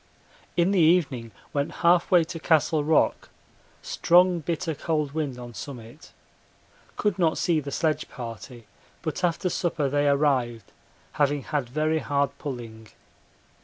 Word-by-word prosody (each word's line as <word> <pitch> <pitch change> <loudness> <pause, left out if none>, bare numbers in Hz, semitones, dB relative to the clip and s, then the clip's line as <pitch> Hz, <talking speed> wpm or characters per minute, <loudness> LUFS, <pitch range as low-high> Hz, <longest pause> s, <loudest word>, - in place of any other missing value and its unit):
In 175 +2 +3
the 195 - +2
evening 155 -8 +2 0.2
went 140 0 -1
half 175 0 +4
way 175 -2 +5
to 165 +1 -7
Castle 155 -1 +2
Rock; 155 +1 +2 0.5
strong 180 0 +3
bitter 165 +1 -2
cold 150 -1 -2
wind 145 -4 -3
on 120 -1 -9
summit. 120 +4 -10 0.9
Could 205 -3 0
not 165 -3 +2
see 165 -3 +2
the 140 -1 -6
sledge 155 +2 -1
party, 115 0 -9 0.4
but 160 +2 -4
after 175 +1 +1
supper 165 -5 -1
they 145 +1 +1
arrived, 130 -7 0 0.4
having 145 -1 0
had 145 -5 -2
very 155 +4 0
hard 140 -2 -1
pulling. 115 -6 -7
150 Hz, 135 wpm, -25 LUFS, 130-165 Hz, 0.9 s, way